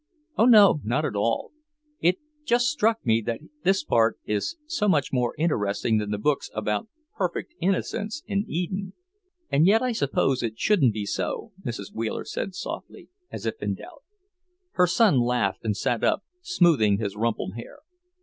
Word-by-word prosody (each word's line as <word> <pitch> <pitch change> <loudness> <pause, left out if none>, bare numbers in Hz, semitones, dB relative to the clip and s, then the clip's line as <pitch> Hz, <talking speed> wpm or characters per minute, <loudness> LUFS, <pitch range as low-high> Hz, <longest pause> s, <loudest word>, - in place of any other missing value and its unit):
"Oh 225 - +4
no, 205 -9 +7
not 130 +8 0
at 105 - -3
all! 115 +3 0 0.5
It 175 +2 +3 0.3
just 245 -3 +2
struck 225 - +1
me 115 -1 +3
that 115 -1 -1 0.2
this 195 -2 +2
part 115 -5 +2
is 105 - -2
so 305 -10 0
much 145 -7 +1
more 125 -2 0
interesting 110 -8 +1
than 105 -1 -3
the 105 - -1
books 140 +7 0
about 105 - -1 0.3
perfect 345 - -3
innocence 205 +7 -1
in 200 -1 -1
Eden." 185 +2 -3 0.6
"And 155 +5 +4
yet 220 +4 +4
I 255 - +1
suppose 140 - +1
it 110 -2 -3
shouldn't 140 - +3
be 105 -2 -3
so," 95 - -3
Mrs. 115 -6 -5
Wheeler 110 0 -3
said 185 +5 -4
slowly, - - -7 0.2
as - - -7
if 445 - -3
in - - -1
doubt. 340 -5 -13 0.7
Her 180 0 +3
son 185 - +4
laughed 120 -5 0
and 105 -2 -1
sat 120 -2 -1
up, - - +2 0.2
smoothing 165 - +3
his 100 -2 -3
rumpled 110 -3 -1
hair. 115 - -9
140 Hz, 170 wpm, -25 LUFS, -, 0.7 s, no